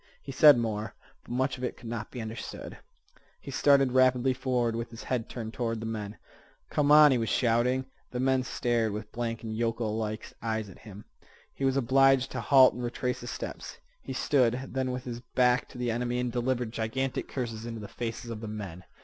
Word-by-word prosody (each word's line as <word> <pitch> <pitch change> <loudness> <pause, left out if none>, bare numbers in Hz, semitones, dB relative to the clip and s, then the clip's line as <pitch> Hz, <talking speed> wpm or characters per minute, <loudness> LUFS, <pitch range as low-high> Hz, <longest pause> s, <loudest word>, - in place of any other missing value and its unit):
He 135 - -6
said 145 0 +8
more, 110 -2 -2 0.3
but - - -18
much 130 +1 0
of - - -7
it 125 - -3
could 120 - -11
not 115 -1 -4
be 125 -3 -6
understood. 110 +1 -7 0.6
He - - -9
started 140 -2 +4
rapidly 130 0 +4
forward, 125 -3 0
with 115 0 -4
his 115 0 -10
head 125 -3 -2
turned 115 -2 -6
toward 115 -2 -2
the 110 - -5
men, 105 -2 -5 0.5
"Come 145 -1 +2
on," 150 -1 +9
he 125 - +2
was 115 - -1
shouting. 125 +2 +2 0.2
The 125 - -4
men 130 0 +2
stared 120 -3 0
with 105 +1 -6
blank 115 -1 -3
and 110 -1 -4
yokel 115 -1 -1
like 110 -1 -4
eyes 110 -2 -2
at 95 - -14
him. 105 -2 -12 0.5
He 135 - -2
was 135 0 +2
obliged 135 +1 +4
to - - -3
halt 135 -2 +6
and 125 - -6
retrace 125 +1 -2
his 120 - -7
steps. - - -6 0.2
He - - -6
stood 130 -2 +1
then 130 -1 -1
with 125 0 -4
his 120 -2 -5
back 125 0 +1
to - - -12
the 125 -1 -1
enemy 120 +1 -1
and 125 -1 -1
delivered 125 -1 -1
gigantic 130 +4 -2
curses 115 -3 -4
into 115 -1 -5
the 105 - -7
faces 115 +1 -5
of 110 -1 -6
the 110 - -5
men. 100 -5 -7
120 Hz, 210 wpm, -29 LUFS, 115-130 Hz, 0.6 s, on